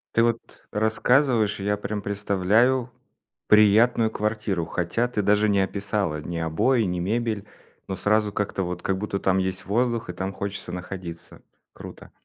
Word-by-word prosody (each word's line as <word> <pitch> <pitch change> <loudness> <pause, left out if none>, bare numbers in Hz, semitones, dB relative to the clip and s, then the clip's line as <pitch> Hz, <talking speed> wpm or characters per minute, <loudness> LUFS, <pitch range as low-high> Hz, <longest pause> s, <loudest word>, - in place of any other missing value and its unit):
Ты 115 - +5
вот 115 -1 -2
рассказываешь, 110 +1 +2
и - - -5
я 105 +1 0
прям 105 +1 -4
представляю 105 +6 +1 0.6
приятную 110 +2 +5
квартиру, 105 -5 -2
хотя 90 +9 -1
ты 120 -4 -2
даже 105 +1 +3
не 100 -1 +3
описала 100 -5 -2
ни 85 +2 -5
обои, 85 +11 +1
ни 90 -3 -2
мебель. 110 +2 -1 0.4
Но 95 - -3
сразу 105 +3 +1
как-то 100 -2 -2
вот, 90 0 -4
как 95 - 0
будто, 100 0 -3
там 95 -1 +1
есть 95 0 -3
воздух, 115 +2 0
и - - -3
там 95 +2 -3
хочется 100 +1 -5
находиться. 90 -2 -8 0.3
Круто. - - -11
105 Hz, 155 wpm, -24 LUFS, 95-110 Hz, 0.6 s, Ты